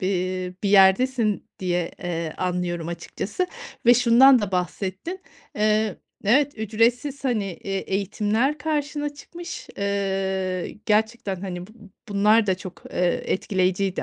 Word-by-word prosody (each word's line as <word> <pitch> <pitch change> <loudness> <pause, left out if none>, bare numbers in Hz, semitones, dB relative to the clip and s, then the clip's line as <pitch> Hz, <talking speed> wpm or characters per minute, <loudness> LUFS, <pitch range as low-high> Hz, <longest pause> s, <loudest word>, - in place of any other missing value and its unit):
eee, 185 -1 -1
bir 200 - +1
yerdesin 210 +3 +4
diye, 175 -2 -1
eee, 165 -2 -3
anlıyorum 175 -2 -2
açıkçası 190 - -3 0.4
ve 240 - +9
şundan 245 +2 +7
da 200 -2 -3
bahsettin, 190 - -3 0.4
eee, 215 -1 +2 0.3
evet, 275 +5 +3
ücretsiz, 235 +6 0
hani, 235 -6 +1
eee, 195 +1 -4
eğitimler 210 +9 0
karşına 295 -1 -2
çıkmış. 345 +4 -9
Eee, 190 -2 -1
gerçekten, 215 -3 0
hani, 180 -2 -5
bu - - -17 0.4
bunlar 210 +2 +4
da 190 - +3
çok, 185 0 -10
eee, 180 -1 0
etkileyiciydi 185 0 0
200 Hz, 120 wpm, -24 LUFS, 185-235 Hz, 0.4 s, ve